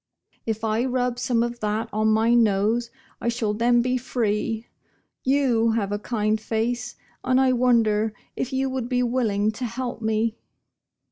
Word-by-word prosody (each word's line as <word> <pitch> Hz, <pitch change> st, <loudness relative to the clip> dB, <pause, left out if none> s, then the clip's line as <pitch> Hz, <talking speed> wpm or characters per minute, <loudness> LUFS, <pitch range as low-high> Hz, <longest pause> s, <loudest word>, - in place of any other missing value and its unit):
If 220 Hz, 0 st, -2 dB
I 220 Hz, +1 st, +1 dB
rub 250 Hz, -1 st, -1 dB
some 235 Hz, -1 st, +1 dB
of 240 Hz, 0 st, -4 dB
that 215 Hz, +1 st, -1 dB
on 215 Hz, +1 st, +1 dB
my 220 Hz, +2 st, +3 dB
nose 225 Hz, +1 st, +2 dB, 0.3 s
I 235 Hz, -, 0 dB
shall 230 Hz, -3 st, -1 dB
then 240 Hz, +2 st, +3 dB
be 255 Hz, +1 st, +1 dB
free. 225 Hz, -2 st, -1 dB, 0.6 s
You 250 Hz, -5 st, +2 dB
have 205 Hz, -3 st, -1 dB
a 205 Hz, -, -1 dB
kind 215 Hz, -1 st, -1 dB
face, 235 Hz, +2 st, -2 dB, 0.3 s
and 255 Hz, 0 st, +3 dB
I 260 Hz, -1 st, +4 dB
wonder 225 Hz, -3 st, +3 dB, 0.2 s
if 255 Hz, -, -3 dB
you 265 Hz, 0 st, 0 dB
would 260 Hz, -2 st, -3 dB
be 250 Hz, -1 st, +1 dB
willing 220 Hz, -4 st, +1 dB
to 245 Hz, +4 st, -5 dB
help 240 Hz, 0 st, -4 dB
me?" 220 Hz, 0 st, 0 dB
230 Hz, 160 wpm, -24 LUFS, 220-245 Hz, 0.6 s, I